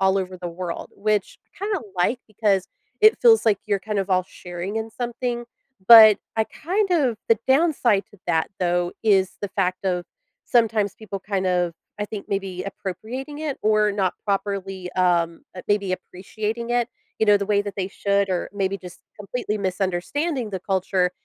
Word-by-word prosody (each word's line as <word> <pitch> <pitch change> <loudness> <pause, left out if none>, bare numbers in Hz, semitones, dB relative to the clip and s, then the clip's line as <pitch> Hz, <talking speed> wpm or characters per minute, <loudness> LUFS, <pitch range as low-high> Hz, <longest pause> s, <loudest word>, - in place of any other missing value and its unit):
all 190 0 +3
over 185 -1 -4
the 175 - -5
world- 170 0 -5
which 210 -1 0 0.2
I - - -19
kinda 405 -5 -1
like 215 +8 +1
because 200 -3 +1 0.3
it 430 +1 +6
feels 455 -2 +6
like 210 -3 +4
you're 200 -2 0
kind 210 0 -3
of 195 0 -1
all 185 0 +3
sharing 180 +4 -6
in 220 0 -2
something, 240 0 -3 0.4
but 220 -3 +10 0.2
I 220 - +3
kind 385 - -2
of 265 -10 +2
the 230 - +4
downside 265 -8 +3
to 205 - -17
that, 160 0 +1
though, 175 0 +1
is 195 -4 +3
the 205 - -2
fact 185 -1 -1
of 180 -2 0 0.4
sometimes 220 -4 +2
people 205 -3 -7
kind 190 -1 -2
of 180 -2 +1 0.3
I - - +1
think, 210 -1 -7
maybe 195 -2 -3
appropriating 235 +9 -6
it 300 -3 -3
or 215 -1 +3
not 190 -3 0
properly, 195 -2 -2
um, 170 -2 +1
uh, 185 - -6
maybe 205 -2 +1
appreciating 215 +5 -4
it, 240 -1 +1 0.3
you 220 - +2
know, 205 0 +7
the 200 - -2
way 205 -1 +3
that 205 -2 -6
they 190 -1 -2
should 200 0 0
or 180 -2 -1
maybe 195 -1 -1
just 180 -2 -11 0.2
completely 210 +1 -3
misunderstanding 200 - -1
the 190 -2 -4
culture 185 -1 +1
200 Hz, 180 wpm, -23 LUFS, 185-225 Hz, 0.4 s, but